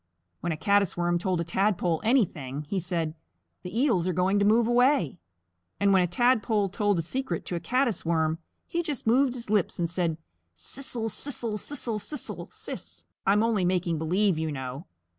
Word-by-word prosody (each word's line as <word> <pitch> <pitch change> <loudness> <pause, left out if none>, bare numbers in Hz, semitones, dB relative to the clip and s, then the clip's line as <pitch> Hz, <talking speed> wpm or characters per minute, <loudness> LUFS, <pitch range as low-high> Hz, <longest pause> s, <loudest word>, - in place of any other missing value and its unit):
When 175 - -2
a 155 - -2
Caddis 200 0 +2
Worm 175 0 +1
told 180 -1 0
a - - 0
Tadpole 175 -1 0
anything, 155 - +1
he 190 +6 -2
said, 170 -3 0 0.5
"The 180 +5 -4
Eels 195 - +2
are 185 - +1
going 185 +4 +2
to 200 - +3
move 225 +3 +4
away." 240 - +2 0.6
And 200 0 +4
when 190 - +5
a 180 - +2
Tadpole 215 +1 +2
told 205 0 +1
a 165 - 0
secret 185 -1 -3
to 180 - -3
a - - -1
Caddis 245 +5 0
Worm, 160 -1 +1 0.3
he 340 - -1
just 300 -6 -4
moved 255 +3 +3
his 235 -4 -5
lips 205 -5 +1
and 170 - 0
said, 170 -2 -1 0.4
"Siss 250 - -1
el, 225 -1 -1
siss 270 +4 -2
el, 220 -2 -1
siss 285 +4 -4
el 230 +6 -4
siss. - - -8 0.2
I'm 205 +2 +4
only 225 -4 +1
making 175 -3 0
believe, 180 +2 +1
you 160 -1 -1
know." 130 +3 -6
190 Hz, 190 wpm, -27 LUFS, 170-230 Hz, 0.6 s, when